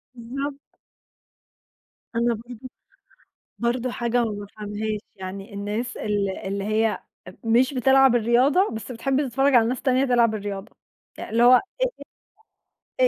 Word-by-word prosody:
بالضبط. 275 +4 -6 1.5
أنا 235 0 +2
برضه 240 +3 -10 0.9
برضه 240 +1 0
حاجة 240 0 0
ما 220 - -1
بافهَمهاش، 210 +1 -5 0.2
يعني 195 +1 -8
الناس 210 +4 -4
ال 205 -2 -1
اللي 195 +1 -4
هي 215 +1 +1 0.3
أ 185 - -9
مش 245 +4 +3
بتلعب 265 0 +5
الرياضة 250 - +3
بس 225 +2 -6
بتحب 270 +4 0
تتفرّج 270 +3 +2
على 230 -1 +5
ناس 250 0 -2
تانية 260 0 +2
تلعب 235 -3 +3
الرياضة، 200 -1 -6 0.4
اللي 230 +2 0
هو 250 +1 +8 1.4
إيه - - +6
235 Hz, 125 wpm, -24 LUFS, 210-255 Hz, 1.5 s, هو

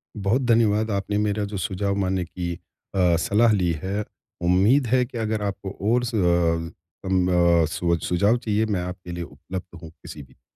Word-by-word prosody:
बहुत 105 +5 +1
धन्यवाद, 110 -2 +3
आपने 100 +1 -1
मेरा 105 0 0
जो 100 - -3
सुझाव 100 0 -2
मानने 95 -1 -1
की 85 0 -4 0.4
अ, 90 -3 +3
सलाह 110 +6 +3
ली 90 -5 +2
है। 100 +3 -2 0.4
उम्मीद 100 +10 +3
है 125 +2 +3
कि 120 - -9
अगर 110 -1 -1
आपको 100 -1 -4 0.2
और 125 +1 +2
सु 115 -2 -2
अ, 85 -3 +1 0.4
म 90 -1 +2 0.3
स 85 +1 -1
सुझाव 100 +7 +2
चाहिए 110 -1 0
मैं 100 -5 -1
आपके 90 0 -7
लिए 85 0 -4
उपलब्ध 90 0 -8
हूँ 80 - -9
किसी 80 -2 -11
भी - - -20
जी। - - -35
100 Hz, 180 wpm, -24 LUFS, 90-110 Hz, 0.4 s, धन्यवाद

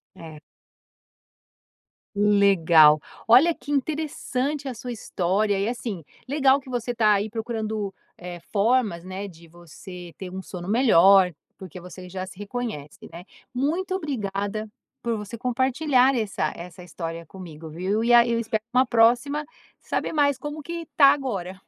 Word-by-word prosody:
É. 160 -4 -11 1.8
Legal. 190 -7 +5 0.3
Olha, 265 +9 +6
que 290 - -11
interessante 290 -1 -2
a 250 - -5
sua 245 +2 -6
história 200 -1 -1
e, 200 - 0
assim, 225 -8 -5 0.2
legal 275 -1 +3
que 265 - -17
você 245 -1 -3
tá 215 -2 +4
aí 205 +1 -1
procurando, 220 -3 -3 0.3
eh, 175 0 -8
formas, 215 -4 +1
né, 190 +2 -6
de 170 -3 -14
você 175 +1 -12
ter 185 -2 -7
um 190 +1 -6
sono 180 -1 -8
melhor, 195 -5 +5 0.2
porque 185 -2 -10
você 180 +1 -11
já 185 0 -5
se 190 - -13
reconhece, 205 -9 -6
né? 170 +2 -10 0.3
Muito 335 +9 -1
obrigada 215 - -3 0.3
por 235 -1 -1
você 210 +2 -7
compartilhar 260 +2 +2
essa 215 -5 -1
essa 180 +1 -10
história 165 -1 -6
comigo, 165 -3 -11
viu? 190 +7 -1
E 240 - +3
a 235 0 +7
eu 235 -1 0
espero 220 -2 -2
uma 255 +1 +5
próxima 245 +6 +3 0.4
saber - - -3
mais 285 -3 +2
como 295 +3 -7
que 335 +1 -6
tá 280 - +8
agora. 195 -10 -5
215 Hz, 145 wpm, -24 LUFS, 180-255 Hz, 1.8 s, tá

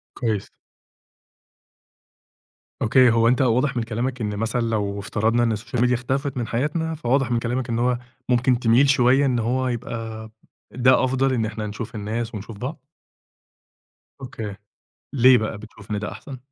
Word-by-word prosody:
كويس. 110 -5 -2 2.3
أوكي، 125 +2 +5
هو 115 0 +3
أنت 125 +3 +3
واضح 130 +2 +2
من 120 - +1
كلامك 120 +3 -3
إن 105 -2 -2
مثلًا 115 +3 -1
لو 105 -3 -1
افترضنا 110 +4 0
إن 115 -2 +1
الsocial 110 +3 -6
media 125 - +2
اختفت 135 +3 -2
من 120 -2 -2
حياتنا، 155 +7 -1
فواضح 135 -3 0
من 120 - +2
كلامك 125 +2 -2
إن 115 - 0
هو 125 0 +1 0.3
ممكن 125 0 +3
تميل 120 +3 +4
شوية 135 +1 +4
إن 125 -3 +1
هو 125 +3 0
يبقى 115 -2 -5 0.4
ده 130 +1 +3
أفضل 130 +1 +1
إن 115 -4 0
إحنا 110 0 -4
نشوف 105 +2 -6
الناس 110 +2 -4
ونشوف 105 +1 -8
بعض؟ 130 +6 -5 1.4
أوكي، 115 -6 -6 0.6
ليه 130 -1 +6
بقى 110 -1 -3
بتشوف 110 0 -14
إن 105 - -1
ده 105 - -4
أحسن؟ 135 -2 -9
120 Hz, 155 wpm, -23 LUFS, 110-130 Hz, 2.3 s, ليه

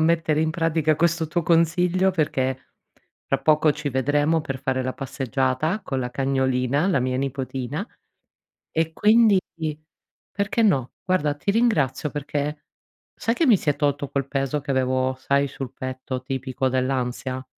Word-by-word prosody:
mettere 160 -1 +2
in 160 - +1
pratica 160 -1 +1
questo 170 0 +1
tuo 170 +2 -1
consiglio, 175 +3 +3
perché 130 -6 -1 0.6
tra - - +2
poco 155 -1 +3
ci 150 -1 -4
vedremo 145 +4 +1
per 135 -3 -5
fare 130 -1 0
la 130 0 -2
passeggiata 135 - -1
con 135 - -3
la 125 -1 -3
cagnolina, 130 +3 +1
la 175 -9 +2
mia 130 0 -1
nipotina, 135 - -3 0.9
e 160 0 0
quindi 215 -1 +5 0.9
perché 200 +3 0
no. 135 - +2
Guarda, 150 -6 +1
ti 200 +7 -1
ringrazio 165 - +1
perché 145 +1 -4 0.5
sai 230 +1 -1
che 330 - +2
mi 225 -7 +6
si 150 - -1
è 145 - +1
tolto 145 -1 -1
quel 140 -1 -2
peso 135 +1 -1
che 140 0 -3
avevo 130 0 +1
sai 140 +1 +1
sul 135 -2 -7
petto 130 0 -5
tipico 130 0 -2
dell'ansia? 130 0 -2
145 Hz, 150 wpm, -24 LUFS, 130-165 Hz, 0.9 s, mi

